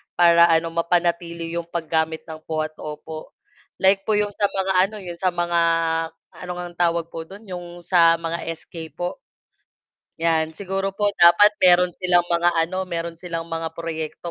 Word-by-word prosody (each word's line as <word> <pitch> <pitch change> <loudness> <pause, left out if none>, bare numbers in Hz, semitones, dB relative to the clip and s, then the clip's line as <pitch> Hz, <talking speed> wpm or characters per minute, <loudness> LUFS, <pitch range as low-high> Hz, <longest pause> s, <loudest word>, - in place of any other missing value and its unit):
para 170 -1 +6
ano 165 0 +2
mapanatili 170 0 -1
'yong 170 0 -4
paggamit 160 -1 -2
ng 160 -1 -9
po 155 -1 -1
at 155 - -5
opo 155 +1 -8 0.4
like 195 +1 +3
po 215 - +2
'yong 205 0 0
sa 205 - +3
mga 190 0 -2 0.2
ano 215 - -11
'yong 175 -1 -8
sa 185 - 0
mga 175 -1 0 0.7
ano 180 0 -8
ngang 175 -1 -8
tawag 170 -1 +1
po 160 0 -7
do'n 200 +3 -12
'yong 175 -2 -9
sa 170 -2 +5
mga 165 0 -4 0.2
SK 160 0 -10
po 175 0 -4 1.0
yan, 160 -1 +1
siguro 195 +1 -3
po 205 0 +2
dapat 175 +5 +7
meron 180 0 +5
silang 180 -1 +3
mga 170 0 +2
ano 185 +3 -1
meron 170 -1 -5
silang 170 -2 -6
mga 165 0 -4
proyekto 165 0 -5
170 Hz, 170 wpm, -22 LUFS, 165-180 Hz, 1.0 s, dapat